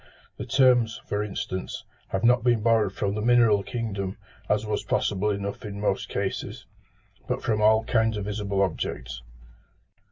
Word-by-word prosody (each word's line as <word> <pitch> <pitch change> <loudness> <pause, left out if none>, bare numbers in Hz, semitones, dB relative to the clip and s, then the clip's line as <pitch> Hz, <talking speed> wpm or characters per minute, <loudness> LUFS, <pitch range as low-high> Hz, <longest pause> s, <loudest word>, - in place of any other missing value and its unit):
The 105 - -6
terms, 125 -3 +3
for 105 0 -1
instance, 105 -2 -4 0.2
have 95 - -3
not 120 0 +4
been 120 -3 +2
borrowed 110 -3 +3
from 100 -1 -1
the 105 - -3
mineral 115 -3 +4
kingdom, 100 -4 -4 0.3
as 105 +1 +1
was 105 -1 -1
possible 105 +1 0
enough 100 +3 -3
in 100 -2 -6
most 100 -2 -1
cases, 100 -1 -4 0.6
but - - -2
from 110 -2 0
all 110 +1 +5
kinds 115 -1 +1
of 100 - -4
visible 100 -2 -1
objects. - - -3
105 Hz, 155 wpm, -26 LUFS, 100-115 Hz, 0.6 s, all